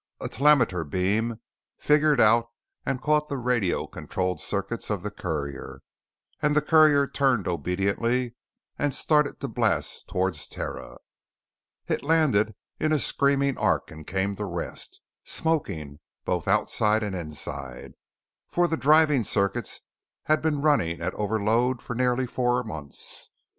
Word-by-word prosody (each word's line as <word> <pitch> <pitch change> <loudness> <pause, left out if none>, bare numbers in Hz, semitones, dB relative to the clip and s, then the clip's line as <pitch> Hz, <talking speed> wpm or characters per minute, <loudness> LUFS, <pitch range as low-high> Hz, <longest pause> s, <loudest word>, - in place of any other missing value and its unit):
A - - -4
telemeter 125 - +3
beam 105 +8 -1 0.4
fingered 150 -2 +3
out 115 +1 +5 0.4
and 135 - 0
caught 150 0 +2
the 140 - -3
radio 120 -7 0
controlled 90 -3 -3
circuits - - -2
of 100 -4 -2
the 105 - -4
courier 75 -8 -5 0.6
and 150 0 +2
the 150 - +4
courier 155 -3 +5
turned 135 -7 +1
obediently 100 +8 -1 0.5
and 145 -2 0
started 150 -2 +2
to 140 - -2
blast 115 -4 -1
towards 95 -4 -1
Terra. - - -7 0.9
It - - -1
landed 140 -10 +2 0.2
in 155 - +1
a 155 - +4
screaming 140 -1 +1
arc - - +1
and 80 0 -11
came 100 +1 -1
to 105 - -3
rest, 85 -3 -6 0.2
smoking 90 - -2 0.3
both - - -1
outside 110 +1 +2
and 100 -2 -3
inside, 70 -6 -6 0.6
for 175 0 +2
the 160 - -1
driving 150 -3 +4
circuits 100 -1 -1 0.4
had 155 0 +2
been 150 -3 0
running 85 - +2
at 85 +2 -2
overload 110 +4 +1
for 120 - -6
nearly 125 +1 +1
four 125 0 0
months. 75 - -4
115 Hz, 135 wpm, -26 LUFS, 95-140 Hz, 0.9 s, out